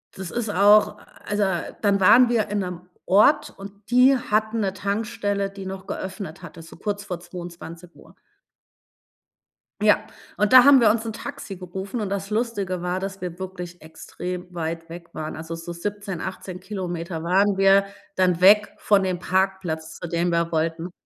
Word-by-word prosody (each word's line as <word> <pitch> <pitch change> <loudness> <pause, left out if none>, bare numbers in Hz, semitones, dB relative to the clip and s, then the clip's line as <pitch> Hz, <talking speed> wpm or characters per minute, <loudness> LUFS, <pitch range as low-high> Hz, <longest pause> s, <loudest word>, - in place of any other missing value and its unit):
das 190 -2 -7
ist 235 -3 -3
auch 205 +2 +5 0.3
also, 205 0 0 0.4
dann 200 -2 +2
waren 235 +6 +6
wir 230 -3 +1
in 205 0 -1
'nem 180 -2 -4 0.2
Ort 210 +10 +4
und 200 +2 -12
die 250 +2 +6
hatten 220 0 0
'ne 195 -2 -1
Tankstelle, 205 -1 -2
die 195 -1 -9
noch 190 0 -7
geöffnet 190 -3 -6
hatte, 165 0 -10
so 165 - -13
kurz 205 -1 -3
vor 180 -4 -5
22:00 175 -1 -10
Uhr. - - -18 1.7
Ja, 210 -1 +3 0.3
und 210 +2 +1
da 255 -1 +10
haben 280 -2 +8
wir 220 - +5
uns 225 +1 0
'n 225 - -4
Taxi 205 -1 -7
gerufen, 190 +5 -6
und 205 - -2
das 200 +1 -3
Lustige 205 -5 -2
war, 180 +1 -2
dass 195 0 -5
wir 175 -1 -6
wirklich 180 -2 -7
extrem 180 +3 -7
weit 165 0 -4
weg 170 +1 -10
waren. 155 0 -5
Also 160 +1 -6
so 165 +1 -7
17, 200 0 -5
18 185 -1 -6
Kilometer 175 -4 -5
waren 195 +3 +3
wir 195 0 +5 0.3
dann 180 -2 +2
weg 205 +3 +6
von 200 -2 +3
dem 185 -2 -1
Parkplatz, 180 -4 -2
zu 170 - -6
dem 170 +1 0
wir 170 0 0
wollten. 165 +2 -1
190 Hz, 170 wpm, -23 LUFS, 175-205 Hz, 1.7 s, da